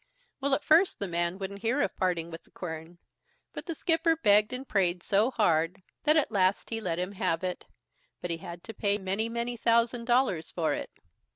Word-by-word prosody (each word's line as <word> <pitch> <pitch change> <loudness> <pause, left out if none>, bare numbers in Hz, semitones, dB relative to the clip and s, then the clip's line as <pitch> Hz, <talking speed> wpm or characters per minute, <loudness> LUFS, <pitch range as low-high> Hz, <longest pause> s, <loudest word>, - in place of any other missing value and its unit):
Well, 280 0 +2
at 295 - -4
first 330 +5 +4
the 200 - -3
man 170 +1 -1
wouldn't 200 0 -6
hear 235 +5 +1
of 290 - 0
parting 170 -2 -1
with 165 +1 -8
the - - -26
quern; 160 0 -7 0.6
but - - -7
the 335 - -3
skipper 325 +1 +2
begged 210 -8 +4
and 255 +2 -5
prayed 180 -3 +1
so 210 +4 +3
hard, 180 -6 +1 0.2
that 305 +1 +5
at 305 - +2
last 195 0 +1
he 225 0 -2
let 170 -5 -2
him 180 +2 -2
have 185 -3 -1
it, 180 -1 -3 0.5
but 175 - -4
he 165 - -1
had 170 +1 -9
to 225 - -8
pay 200 -1 +1
many, 200 +3 -2
many 235 +1 -2
thousand 235 +1 +2
dollars 240 -9 +2
for 165 -3 0
it. - - -4
200 Hz, 205 wpm, -29 LUFS, 175-240 Hz, 0.6 s, that